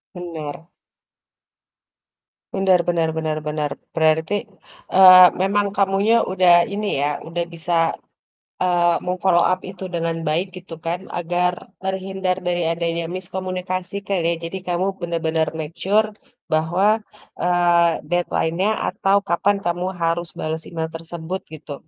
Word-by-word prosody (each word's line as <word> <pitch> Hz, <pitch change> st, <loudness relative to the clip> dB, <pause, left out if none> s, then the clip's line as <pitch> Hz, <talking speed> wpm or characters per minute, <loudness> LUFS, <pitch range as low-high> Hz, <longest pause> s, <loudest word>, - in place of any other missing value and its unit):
Benar. 165 Hz, -2 st, -7 dB, 1.9 s
Benar 190 Hz, -2 st, +4 dB
benar 165 Hz, -2 st, +1 dB
benar 155 Hz, -1 st, -1 dB
benar, 150 Hz, -1 st, -2 dB, 0.2 s
berarti, 160 Hz, +2 st, +2 dB, 0.6 s
eee, 185 Hz, -1 st, +10 dB, 0.2 s
memang 200 Hz, +1 st, +2 dB
kamunya 200 Hz, +3 st, +3 dB, 0.2 s
udah 180 Hz, -2 st, +5 dB, 0.2 s
ini 210 Hz, 0 st, -2 dB
ya 145 Hz, -, +2 dB, 0.2 s
udah 170 Hz, +1 st, -2 dB
bisa, 170 Hz, +1 st, -3 dB, 0.9 s
eee, 175 Hz, -2 st, +2 dB
mem-follow 180 Hz, -1 st, +2 dB
up 185 Hz, -, +1 dB
itu 190 Hz, -1 st, -10 dB
dengan 165 Hz, 0 st, -1 dB
baik 165 Hz, +5 st, +1 dB
gitu 180 Hz, -2 st, -10 dB
kan 170 Hz, +2 st, -1 dB, 0.2 s
agar 175 Hz, +1 st, 0 dB, 0.3 s
terhindar 190 Hz, -1 st, -2 dB
dari 175 Hz, 0 st, 0 dB
adanya 170 Hz, 0 st, -2 dB
miskomunikasi 185 Hz, 0 st, -4 dB
kali 185 Hz, -4 st, 0 dB
ya, 170 Hz, -, +1 dB
jadi 190 Hz, +3 st, -5 dB
kamu 175 Hz, +2 st, 0 dB, 0.2 s
bener-bener 160 Hz, -2 st, 0 dB
make 155 Hz, +1 st, -5 dB
sure 215 Hz, +3 st, +3 dB, 0.5 s
bahwa, 170 Hz, +5 st, +2 dB, 0.5 s
eee, 175 Hz, -1 st, +3 dB, 0.2 s
deadline-nya 175 Hz, +2 st, 0 dB, 0.2 s
atau 195 Hz, +1 st, +2 dB
kapan 200 Hz, +4 st, +2 dB
kamu 175 Hz, +1 st, -1 dB, 0.2 s
harus 170 Hz, +1 st, 0 dB
bales 160 Hz, +1 st, -3 dB
email 160 Hz, -1 st, -3 dB
tersebut 165 Hz, +2 st, -6 dB
gitu. 150 Hz, -1 st, -8 dB
175 Hz, 125 wpm, -21 LUFS, 165-185 Hz, 1.9 s, eee